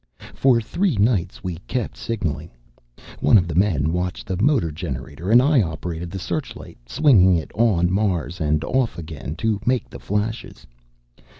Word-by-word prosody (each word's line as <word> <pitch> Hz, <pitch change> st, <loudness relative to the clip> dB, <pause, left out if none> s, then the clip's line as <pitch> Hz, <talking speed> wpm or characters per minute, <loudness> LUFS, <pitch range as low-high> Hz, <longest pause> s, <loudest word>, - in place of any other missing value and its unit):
"For 130 Hz, -3 st, +3 dB
three 170 Hz, -, -1 dB
nights 100 Hz, -5 st, 0 dB
we 90 Hz, -3 st, -4 dB
kept 125 Hz, -4 st, -3 dB
signaling. 85 Hz, -8 st, -3 dB, 0.7 s
One -, -, +5 dB
of 90 Hz, -3 st, +1 dB
the 85 Hz, -, -4 dB
men 80 Hz, -4 st, +1 dB
watched 90 Hz, 0 st, -3 dB
the 95 Hz, -4 st, -3 dB
motor 120 Hz, -, +2 dB
generator, 75 Hz, +1 st, -6 dB
and 120 Hz, +3 st, +6 dB
I 145 Hz, -2 st, +4 dB
operated 85 Hz, -1 st, -4 dB
the 95 Hz, -, -6 dB
searchlight, 90 Hz, -, -5 dB
swinging 95 Hz, -, +5 dB
it 80 Hz, -, -3 dB
on 95 Hz, -6 st, +2 dB
Mars 95 Hz, -4 st, -1 dB
and 75 Hz, 0 st, +1 dB
off 130 Hz, +2 st, 0 dB
again, 80 Hz, -2 st, -7 dB
to 110 Hz, +3 st, -1 dB
make 125 Hz, 0 st, 0 dB
the -, -, -9 dB
flashes. 105 Hz, +3 st, -4 dB
95 Hz, 160 wpm, -22 LUFS, 85-115 Hz, 0.7 s, and